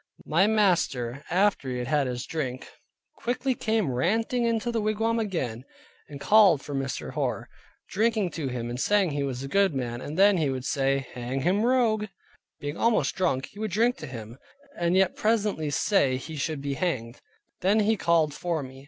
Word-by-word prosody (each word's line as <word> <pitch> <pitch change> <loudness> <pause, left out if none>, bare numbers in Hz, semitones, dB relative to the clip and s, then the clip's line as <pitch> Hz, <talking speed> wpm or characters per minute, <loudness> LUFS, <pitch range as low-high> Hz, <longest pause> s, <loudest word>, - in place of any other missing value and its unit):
My 175 +6 +3
master 150 - +1
after 190 -6 +1
he 125 - -3
had 125 - -3
had 140 +1 +1
his 125 -1 -4
drink, 130 -5 -4 0.5
quickly 255 +2 -1
came 220 - 0
ranting 225 - 0
into 230 +1 0
the 230 -2 -1
wigwam 225 +2 0
again, 135 - -3 0.5
and 145 -2 -8
called 200 -6 +5
for 145 - -7
Mr. 135 -1 -3
Hoar, - - -2 0.4
drinking 215 -2 +1
to 155 -4 -4
him, 125 -2 -4
and 120 - -5
saying, 200 +1 +2
he 145 0 -2
was 135 -2 -3
a - - -4
good 195 0 +2
man, 120 -2 -3
and 150 +3 -6
then 200 0 +5
again - - 0
he 145 - +1
would 130 -1 -4
say, 135 -1 0
"hang 125 +2 -3
him 185 +7 +2
rogue." 230 -4 +2 0.5
Being 145 +2 -5
almost 230 -1 +2
drunk, 170 -8 -1
he 200 - -13
would 220 0 -2
drink 230 +6 +2
to - - -8
him, 115 0 -9 0.4
and 170 +1 +1
yet 190 -1 +3
presently 210 -8 0
say 140 -3 +2
he 155 +5 -8
should 150 0 -3
be 140 -1 -2
hanged. 130 -7 -3 0.4
Then 205 +4 +3
he 220 +2 +2
called 165 -5 +2
for 170 -2 -2
me. 130 0 -10
165 Hz, 190 wpm, -26 LUFS, 135-210 Hz, 0.5 s, called